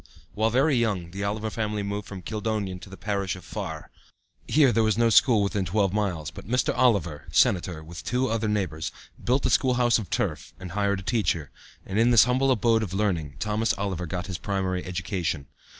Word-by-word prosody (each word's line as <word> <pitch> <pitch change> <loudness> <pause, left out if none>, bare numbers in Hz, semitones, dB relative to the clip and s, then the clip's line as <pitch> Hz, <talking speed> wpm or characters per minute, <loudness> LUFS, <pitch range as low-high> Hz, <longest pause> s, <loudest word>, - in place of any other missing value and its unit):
While 110 +2 +1
very 135 +5 +3
young 100 -8 0
the 100 +2 -5
Oliver 110 +2 -2
family 105 -2 -2
moved 100 0 -4
from 95 -3 -8
Kildonan 105 -3 -3
to 95 - -12
the 95 - -10
parish 100 0 -2
of 90 -2 -12
Farr. 85 -8 -6 0.6
Here 145 -4 +5
there 115 - +2
was 110 -1 +2
no 115 -1 +3
school 110 -2 +5
within 100 0 0
twelve 95 +1 +1
miles, 90 -7 -1
but - - -11
Mr. 125 +3 +1
Oliver, 100 -12 +1
sen., 90 - +4 0.2
with 85 +1 -9
two 125 +1 0
other 115 -1 -1
neighbors, 95 -7 -2 0.3
built 130 +3 +1
a - - +2
school 130 -1 +3
house 120 -1 +3
of 100 -6 -6
turf, - - -2
and 90 -2 -7
hired 100 0 0
a - - -12
teacher, 95 - 0 0.3
and 95 +3 -1
in 115 +1 +5
this 120 -2 +7
humble 130 +2 +2
abode 115 -2 +3
of 95 -4 -4
learning 85 -8 -1
Thomas 110 +1 0
Oliver 95 -3 -3
got 90 +1 -4
his 90 -4 -5
primary 95 -1 -2
education. 90 -4 -3
100 Hz, 200 wpm, -26 LUFS, 90-115 Hz, 0.6 s, this